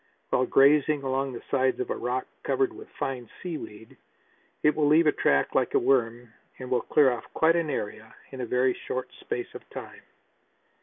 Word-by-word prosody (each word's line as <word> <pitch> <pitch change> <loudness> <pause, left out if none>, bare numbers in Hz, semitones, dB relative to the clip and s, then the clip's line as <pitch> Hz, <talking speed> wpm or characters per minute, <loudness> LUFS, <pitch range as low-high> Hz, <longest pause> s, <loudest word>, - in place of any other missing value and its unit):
While 130 - +2
grazing 145 +1 +4
along 135 0 -1
the 120 - -8
sides 130 -1 +2
of 125 - -3
a - - 0
rock 125 +2 -2 0.2
covered 390 -3 0
with 415 +5 -12
fine 125 -3 -4
sea 175 -4 -4
weed 105 +2 -11 0.7
it 150 - +4
will 150 -2 +2
leave 160 +3 +5
a 150 - +5
track 70 - +1
like - - +1
a - - +7
worm 120 -2 +1 0.2
and 130 -1 -8
will 125 -2 +2
clear 140 +1 +4
off 120 -2 -6
quite 165 +1 +4
an 165 -2 0
area 110 -3 -5 0.2
in 130 -1 -6
a 120 - -3
very 125 +2 +2
short 130 +1 -5
space 120 - -5
of - - -8
time. - - -9
130 Hz, 195 wpm, -27 LUFS, 120-150 Hz, 0.7 s, a